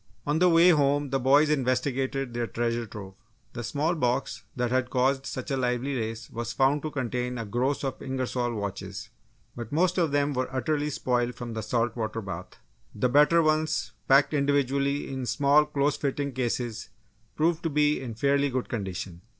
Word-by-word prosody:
On 150 +2 +1
the 180 0 +5
way 170 +1 +6
home 145 -3 +2
the 135 - +1
boys 145 +4 +4
investigated 135 -1 0
their 120 0 -2
treasure 115 0 -2
trove. 100 -3 -9 0.4
The 120 - -5
small 145 +8 0
box 125 -4 -1
that 125 -1 -1
had 130 -1 +1
caused 135 +1 +1
such 130 +2 -5
a 135 - +1
lively 125 +2 -1
race 115 -1 -4
was 120 0 -4
found 140 +2 +2
to 155 - -3
contain 125 -2 -3
a 115 - -4
gross 125 +8 -1
of 135 -2 -3
Ingersol 125 -2 -2
watches. 100 +1 -5 0.4
But 120 -2 -7
most 180 +4 +2
of 165 -4 +2
them 145 0 +1
were 130 -1 -2
utterly 145 +3 -1
spoiled 125 -3 -1
from 120 -2 -6
the 110 - -3
salt 115 +1 -1
water 115 -1 -3
bath. 95 -4 -7 0.4
The 115 +4 +1
better 150 +5 +5
ones, 155 0 +1 0.2
packed 140 +3 +5
individually 140 0 +1
in 130 -2 -4
small 140 +5 +4
close 145 -1 0
fitting 140 0 -2
cases, 120 -2 -3 0.5
proved 165 +1 +1
to 165 - -1
be 150 0 +2
in 120 -4 -6
fairly 140 +3 +2
good 130 -1 -3
condition. 95 -5 -5
130 Hz, 180 wpm, -27 LUFS, 120-145 Hz, 0.5 s, way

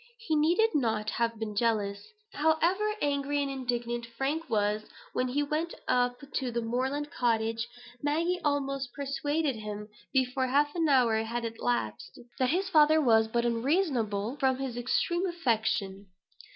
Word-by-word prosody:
He 450 -9 -1
needed 345 +9 +3
not 220 -6 0
have 230 0 -1
been 215 -1 -4
jealous. 205 -3 0 0.3
However 340 +7 +2
angry 285 0 0
and 280 -1 -1
indignant 240 -2 -2
Frank 280 +7 -3
was 210 0 +1 0.3
when 255 - 0
he 280 +4 0
went 305 +4 -2
up 245 0 +2 0.2
to 260 -2 -1
the 235 0 -1
moorland 265 +5 -2
cottage, 230 -1 0 0.3
Maggie 335 +5 0
almost 275 -3 -1
persuaded 280 0 -1
him, 210 0 -6 0.2
before 260 0 +1
half 290 +3 +2
an 330 -3 +1
hour 245 -5 +4
had 230 +2 -2
elapsed, 225 - -2 0.2
that 255 -1 +2
his 370 +6 +1
father 310 -3 +5
was 225 -6 +4
but 235 +1 0
unreasonable 235 - 0
from 265 -2 +2
his 265 -3 -4
extreme 345 +9 0
affection. 220 - -1
260 Hz, 145 wpm, -29 LUFS, 230-295 Hz, 0.3 s, father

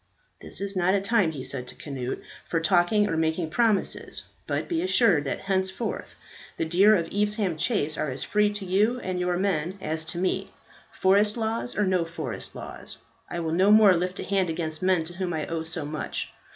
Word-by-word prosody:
"This - - -5
is 200 0 -3
not 185 +1 +3
a - - +3
time," 200 -3 +2
he 135 -4 -6
said 125 -2 -1
to - - -9
Cnut, 130 -3 -4 0.3
"for 165 - 0
talking 175 +5 +3
or 165 - -1
making 160 0 0
promises, 220 -1 +1 0.2
but - - -1
be 335 -2 0
assured 230 - +3
that 140 - -2
henceforth 190 +3 -2 0.4
the - - 0
deer 190 +6 +5
of 170 -4 0
Evesham 205 -3 0
Chase 155 - 0
are 155 - 0
as 130 +1 -3
free 210 +6 +2
to 205 -1 -5
you 210 +7 +2
and 185 -1 -3
your 180 0 0
men 185 -1 0
as 160 -2 -2
to 160 +2 -5
me. 185 +1 -1 0.4
Forest 205 +3 +3
laws 225 +2 -2
or 210 - +3
no 185 -2 +2
forest 160 -7 -6
laws, - - -7 0.3
I 175 - -3
will 160 -1 -2
no 190 +4 +4
more 210 -2 +8
lift 180 +2 -2
a - - -3
hand 190 -3 +1
against 160 -1 -3
men 185 -3 +3
to 165 +2 -7
whom 180 -1 -3
I 155 -1 -2
owe 165 -1 -3
so 160 -1 -4
much. 150 +1 -4
185 Hz, 205 wpm, -26 LUFS, 160-200 Hz, 0.4 s, more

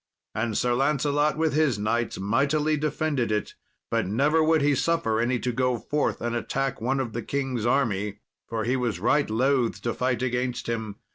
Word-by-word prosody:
And 110 -1 -1
Sir 120 -1 +1
Lancelot, 145 +3 +1
with 160 -1 +1
his 150 -6 +2
knights, 115 +3 -1
mightily 140 +9 +1
defended 150 -5 -1
it; 105 0 -1 0.4
but - - +1
never 145 +10 +2
would 160 -2 +3
he 145 0 +4
suffer 140 -6 +1
any 120 +2 +1
to 125 +1 -2
go 125 0 +1
forth 150 +5 -1
and 120 0 -2
attack 135 +2 -2
one 135 +4 0
of 120 -4 -3
the 120 - -3
king's 130 -3 -2
army, 105 -6 0 0.3
for 115 -1 -2
he 125 +4 +1
was 120 -8 -1
right 140 +7 +2
loth 125 +2 +1
to 120 - -1
fight 125 0 -1
against 125 0 -1
him. 110 -3 -3
125 Hz, 185 wpm, -26 LUFS, 115-145 Hz, 0.4 s, he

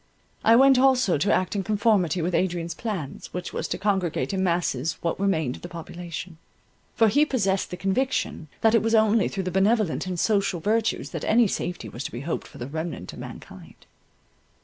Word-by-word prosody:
I 225 - +6
went 265 +1 +6
also 255 - +3
to 200 - +2
act 185 +2 +1
in 200 - 0
conformity 200 -4 +1
with 175 +2 -1
Adrian's 170 -2 0
plans, 190 - -5
which 180 0 -5
was - - -3
to - - -3
congregate 190 -8 -1
in 190 -1 0
masses 165 -5 0
what 170 +1 -2
remained 160 -10 0
of - - -17
the 175 - -8
population; 170 0 -7 0.6
for 225 - +5
he 285 +8 +4
possessed 200 -10 0
the 180 - -6
conviction 195 - -1
that 225 0 +4
it 230 - +5
was 225 +1 +2
only 220 -1 +4
through 195 - -3
the 185 - -3
benevolent 195 -2 +1
and 180 -2 -3
social 200 -4 +1
virtues 220 +6 0
that - - -5
any 235 +2 +4
safety 180 -3 -3
was 120 - -7
to - - -4
be 120 - -6
hoped 160 +4 -4
for - - -14
the 120 - -5
remnant 155 - -5
of - - -10
mankind. - - -11
190 Hz, 195 wpm, -25 LUFS, 170-220 Hz, 0.6 s, I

